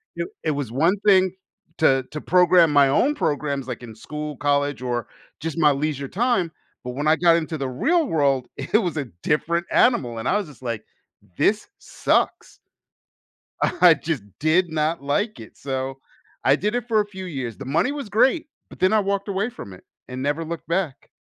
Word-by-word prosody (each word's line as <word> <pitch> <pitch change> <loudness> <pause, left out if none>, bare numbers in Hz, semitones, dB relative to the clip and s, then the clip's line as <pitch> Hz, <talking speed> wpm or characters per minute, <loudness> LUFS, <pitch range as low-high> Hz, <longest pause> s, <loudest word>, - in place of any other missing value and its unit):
It - - -4
it 155 - +1
was 140 -5 -3
one 165 +10 +2
thing 190 -3 +5 0.5
to 135 -4 +3
to 150 - -5
program 180 -2 +5
my 145 -2 +5
own 270 - +2
programs, 140 - -1
like, 125 -1 -6
in 115 -2 -10
school, 150 +4 -6
college, 145 -1 0
or 120 -2 -2 0.3
just 160 0 -4
my 150 -3 +5
leisure 140 -1 -2
time, 195 - 0 0.3
but 125 - -5
when 145 +4 -3
I 155 - +5
got 170 0 +4
into 160 -1 -3
the 135 -2 -3
real 315 - +1
world, 140 - +1
it 180 +11 +1
was 175 -4 -3
a 145 - -1 0.2
different 170 +3 0
animal, 125 - +3
and 110 - -4
I 205 - +3
was 205 - -3
just 145 -4 -15
like, 115 -4 -4 0.5
"This 215 +1 +2
sucks." - - -1 1.0
I 175 -2 +5
just 150 -5 -3 0.2
did 170 +4 +2
not 155 0 -1
like 205 +10 -1
it, 110 - -12
so 135 0 -4 0.4
I 135 - +5
did 210 +8 -1
it 245 -1 -2
for 220 -2 +3
a 210 - +1
few 190 -2 -8
years 130 - -5
the 135 - -8
money 155 - +1
was 285 -6 -6
great, 270 +10 +2 0.2
but - - -14
then 185 +3 +3
I 215 - +5
walked 200 0 -1
away 200 +3 -1
from 100 - -10
it, 90 - -15 0.2
and 130 0 -6
never 145 +4 -1
looked 170 +1 -6
back. 170 -5 -2
155 Hz, 195 wpm, -23 LUFS, 135-190 Hz, 1.0 s, thing